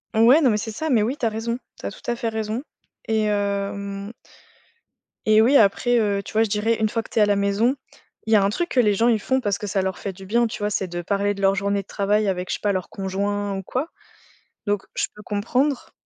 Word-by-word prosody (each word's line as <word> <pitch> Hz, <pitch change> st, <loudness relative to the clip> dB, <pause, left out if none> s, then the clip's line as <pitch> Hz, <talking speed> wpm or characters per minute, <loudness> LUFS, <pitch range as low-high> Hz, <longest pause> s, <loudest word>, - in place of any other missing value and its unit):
Ouais, 240 Hz, +8 st, +6 dB
non, 260 Hz, -5 st, +4 dB
mais 210 Hz, -, +1 dB
c'est 215 Hz, +2 st, -4 dB
ça, 315 Hz, +8 st, -3 dB
mais 235 Hz, -4 st, +4 dB
oui, 245 Hz, +7 st, -1 dB
tu 255 Hz, -, -2 dB
as -, -, +3 dB
raison. 225 Hz, +2 st, -3 dB, 0.2 s
Tu -, -, -9 dB
as -, -, -4 dB
tout -, -, -13 dB
à -, -, -1 dB
fait 230 Hz, -1 st, -2 dB
raison 220 Hz, +1 st, -3 dB, 0.5 s
et 220 Hz, -1 st, +1 dB
hem 200 Hz, 0 st, -2 dB, 1.1 s
et 215 Hz, 0 st, +6 dB
oui, 250 Hz, +6 st, +4 dB
après, 240 Hz, +2 st, +4 dB
heu, 200 Hz, -2 st, +1 dB
tu -, -, -11 dB
vois, 220 Hz, +1 st, +4 dB
je 225 Hz, -, -2 dB
dirais 215 Hz, +3 st, +1 dB
une 215 Hz, -1 st, +2 dB
fois 230 Hz, -, -1 dB
que -, -, -15 dB
tu -, -, -8 dB
es -, -, +5 dB
à -, -, +7 dB
la 205 Hz, -1 st, +2 dB
maison, 200 Hz, +6 st, +2 dB, 0.5 s
il 220 Hz, -, +1 dB
y -, -, +8 dB
a 205 Hz, -, +5 dB
un 195 Hz, -, +3 dB
truc 345 Hz, +12 st, -2 dB
que 255 Hz, -, +1 dB
les 210 Hz, -3 st, +3 dB
gens 225 Hz, +4 st, +2 dB
ils 225 Hz, -3 st, +3 dB
font 260 Hz, +4 st, +1 dB
parce 205 Hz, -5 st, -1 dB
que 210 Hz, -, -5 dB
ça 195 Hz, 0 st, 0 dB
leur 190 Hz, 0 st, -2 dB
fait 200 Hz, -, -4 dB
du 190 Hz, +1 st, -12 dB
bien, 235 Hz, +4 st, +2 dB
tu 220 Hz, -, -7 dB
vois? 205 Hz, 0 st, 0 dB
C'est 195 Hz, -2 st, -1 dB
de 175 Hz, 0 st, -4 dB
parler 200 Hz, +3 st, 0 dB
de 200 Hz, -, -8 dB
leur 195 Hz, 0 st, +4 dB
journée 200 Hz, 0 st, 0 dB
de 195 Hz, -, -20 dB
travail 205 Hz, +1 st, +1 dB
avec, 185 Hz, -1 st, -2 dB
je -, -, 0 dB
sais -, -, -8 dB
pas, 205 Hz, -1 st, +1 dB
leur 185 Hz, -1 st, -3 dB
conjoint 200 Hz, +1 st, -2 dB
ou 195 Hz, -, -5 dB
quoi 260 Hz, -, -3 dB, 0.8 s
donc 205 Hz, -1 st, 0 dB
je -, -, 0 dB
peux 210 Hz, -, -11 dB
comprendre, 245 Hz, +7 st, -1 dB
210 Hz, 275 wpm, -23 LUFS, 200-230 Hz, 1.1 s, y